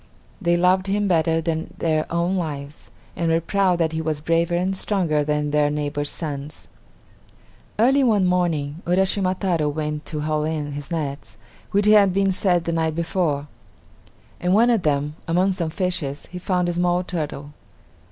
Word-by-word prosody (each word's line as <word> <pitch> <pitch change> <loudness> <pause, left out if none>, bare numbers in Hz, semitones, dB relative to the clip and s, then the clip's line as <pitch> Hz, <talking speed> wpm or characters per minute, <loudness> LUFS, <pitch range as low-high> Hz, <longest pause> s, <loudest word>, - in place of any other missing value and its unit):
They 175 -2 +2
loved 185 +2 +3
him 205 +1 +1
better 165 -2 +2
than 160 0 -3
their 155 -2 0
own 170 +2 0
lives, 150 -5 -5 0.3
and 170 -1 -1
were 165 0 +3
proud 185 +1 +1
that 165 -2 +1
he 160 0 -2
was 155 -2 -2
braver 165 +2 +1
and 185 +2 0
stronger 175 -7 0
than 150 0 -1
their 150 0 +3
neighbors' 145 0 -2
sons. 145 -2 -6 1.1
Early 265 +5 +4
one 210 -6 +3
morning, 170 -4 0
Uraschima 185 +1 +2
Taro 170 -6 +1
went 150 0 -4
to 150 -2 -4
haul 155 0 0
in 155 -2 -2
his 145 0 -7
nets, 140 - -4 0.3
which 205 +1 +1
had 210 -3 +6
been 195 0 +2
set 180 -2 +1
the 170 - -2
night 160 -1 0
before. 165 -4 -1 0.9
In 180 +1 +1
one 235 +4 +5
of 225 -4 +2
them, 150 -1 -1
among 180 +4 +2
some 175 -4 -2
fishes, 160 -5 -2
he 180 - -6
found 180 -1 0
a 175 - 0
small 175 +1 +1
turtle. 150 -5 -4
165 Hz, 170 wpm, -22 LUFS, 150-185 Hz, 1.1 s, had